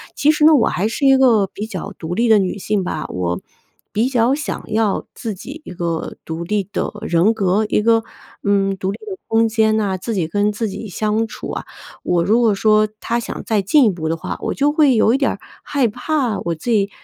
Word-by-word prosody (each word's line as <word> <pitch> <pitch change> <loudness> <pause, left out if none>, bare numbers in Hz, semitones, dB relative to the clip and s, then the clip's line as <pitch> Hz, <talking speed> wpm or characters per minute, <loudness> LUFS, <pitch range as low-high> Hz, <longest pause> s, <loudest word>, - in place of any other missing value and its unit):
其 300 +2 +4
实 300 0 0
呢， 315 0 +7
我 250 - +3
还 200 +4 0
是 275 +5 -2
一 270 0 +7
个 235 -6 +4
比 210 +3 -6
较 205 -2 -6
独 165 +1 -4
立 235 +4 +2
的 220 -2 +6
女 190 0 -1
性 205 0 -1
吧， 160 -3 -3
我 90 -1 -2 0.5
比 225 +4 +1
较 245 0 +2
想 295 +1 -4
要 215 -2 +1
自 225 -3 -5
己 280 - -9
一 - - -9
个 170 -2 -3
独 165 +1 -4
立 205 +1 -1
的 - - -1
人 175 +6 +2
格、 200 0 +1
一 210 - +2
个， 225 0 +3 0.4
嗯， 195 -1 +1
独 190 0 -2
立 - - -6
的 390 -2 -5
空 225 0 +3
间 220 -1 +2
哪、 200 -3 0
自 225 +5 -4
己 175 -5 0
跟 205 +4 +1
自 220 +2 -2
己 205 +3 -6
相 215 +4 0
处 - - -8
啊。 - - -5 0.4
我 175 -1 +1
如 215 +7 +3
果 230 -3 +3
说， 215 +1 +3
他 235 +1 -1
想 235 - -6
再 215 -2 +1
进 270 +8 +4
一 - - +5
步 165 -3 -4
的 165 - 0
话， - - -5
我 - - -2
就 290 +1 +2
会 295 -4 +4
有 220 0 +4
一 - - +3
点 275 - +1
儿 - - -7 0.2
害 275 -5 +1
怕 245 -1 -1
我 170 - -2
自 160 +10 -6
己， 200 -3 +2
215 Hz, 250 characters per minute, -19 LUFS, 190-235 Hz, 0.5 s, 呢